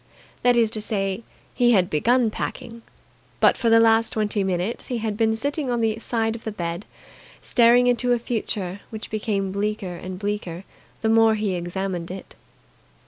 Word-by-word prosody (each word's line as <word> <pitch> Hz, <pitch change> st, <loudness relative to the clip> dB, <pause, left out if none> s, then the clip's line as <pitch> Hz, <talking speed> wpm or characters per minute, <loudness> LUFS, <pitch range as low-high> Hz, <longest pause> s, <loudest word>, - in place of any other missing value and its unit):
That 245 Hz, 0 st, +4 dB
is 230 Hz, -2 st, +3 dB
to 215 Hz, -, -3 dB
say, 195 Hz, -1 st, -1 dB, 0.3 s
he 240 Hz, -1 st, +4 dB
had 185 Hz, -4 st, +4 dB
begun 230 Hz, +9 st, +2 dB
packing; 230 Hz, +1 st, -5 dB, 0.6 s
but -, -, +5 dB
for 235 Hz, -, 0 dB
the 225 Hz, 0 st, +6 dB
last 225 Hz, 0 st, +4 dB
twenty 210 Hz, -2 st, 0 dB
minutes 190 Hz, +4 st, -2 dB
he 245 Hz, -, -2 dB
had 220 Hz, -2 st, -2 dB
been 220 Hz, 0 st, +2 dB
sitting 285 Hz, +4 st, -2 dB
on 240 Hz, -1 st, 0 dB
the 225 Hz, -1 st, 0 dB
side 225 Hz, -1 st, -1 dB
of 230 Hz, -, -9 dB
the 220 Hz, -, -3 dB
bed, 175 Hz, -1 st, -4 dB, 0.5 s
staring 240 Hz, 0 st, +4 dB
into 245 Hz, 0 st, +2 dB
a 245 Hz, -, +4 dB
future 210 Hz, -5 st, -3 dB
which 220 Hz, -1 st, -8 dB
became 205 Hz, -3 st, -1 dB
bleaker 200 Hz, -2 st, -2 dB
and 185 Hz, +1 st, -7 dB
bleaker 200 Hz, -3 st, -4 dB, 0.4 s
the 220 Hz, -, +2 dB
more 225 Hz, 0 st, +5 dB
he 210 Hz, -3 st, -1 dB
examined 175 Hz, 0 st, -3 dB
it. 190 Hz, +1 st, -8 dB
220 Hz, 175 wpm, -23 LUFS, 195-230 Hz, 0.6 s, the